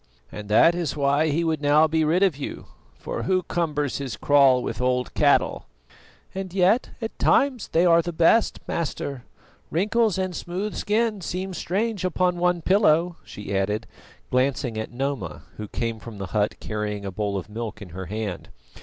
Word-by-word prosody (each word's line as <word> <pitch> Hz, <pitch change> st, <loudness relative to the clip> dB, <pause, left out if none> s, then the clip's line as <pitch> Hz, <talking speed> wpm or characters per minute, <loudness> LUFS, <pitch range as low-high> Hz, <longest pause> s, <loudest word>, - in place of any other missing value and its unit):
"And 105 Hz, -1 st, -8 dB
that 135 Hz, +10 st, +6 dB
is 170 Hz, -4 st, -3 dB
why 140 Hz, +2 st, +2 dB
he 155 Hz, +3 st, +1 dB
would 160 Hz, -3 st, -1 dB
now 150 Hz, +2 st, +5 dB
be 160 Hz, 0 st, +1 dB
rid 170 Hz, +5 st, +2 dB
of 190 Hz, -7 st, +3 dB
you, 140 Hz, -, -6 dB, 0.3 s
for -, -, -5 dB
who 185 Hz, -1 st, +1 dB
cumbers 150 Hz, -6 st, -1 dB
his 130 Hz, -6 st, -5 dB
kraal 135 Hz, -3 st, +4 dB
with -, -, -4 dB
old 125 Hz, 0 st, 0 dB
cattle?" -, -, +2 dB, 0.7 s
"And 190 Hz, -1 st, -5 dB
yet 195 Hz, +6 st, +3 dB
at 225 Hz, -, -5 dB
times 265 Hz, -5 st, +2 dB
they 170 Hz, +2 st, +2 dB
are 170 Hz, -1 st, +6 dB
the 175 Hz, +1 st, -4 dB
best, 170 Hz, +7 st, +3 dB
Master. 140 Hz, -5 st, -3 dB, 0.4 s
Wrinkles 210 Hz, +4 st, +1 dB
and 185 Hz, -2 st, -2 dB
smooth 185 Hz, +6 st, -4 dB
skin 215 Hz, -1 st, 0 dB
seem 185 Hz, +2 st, -4 dB
strange 200 Hz, +5 st, -2 dB
upon 180 Hz, 0 st, +1 dB
one 175 Hz, -1 st, +1 dB
pillow," 175 Hz, -3 st, +3 dB
she 100 Hz, -1 st, -6 dB
added, 105 Hz, +3 st, 0 dB, 0.5 s
glancing 125 Hz, -2 st, +1 dB
at 110 Hz, 0 st, -4 dB
Noma, 135 Hz, -3 st, -4 dB
who 105 Hz, -, -6 dB
came 115 Hz, +1 st, -3 dB
from 110 Hz, -1 st, -10 dB
the 100 Hz, -, -4 dB
hut 105 Hz, -1 st, 0 dB
carrying 105 Hz, -1 st, -4 dB
a 100 Hz, -, -4 dB
bowl 100 Hz, 0 st, -2 dB
of 95 Hz, -, -6 dB
milk 110 Hz, +1 st, -6 dB
in 100 Hz, -4 st, -10 dB
her 95 Hz, +2 st, -7 dB
hand. 105 Hz, -2 st, -5 dB
150 Hz, 175 wpm, -24 LUFS, 110-180 Hz, 0.7 s, that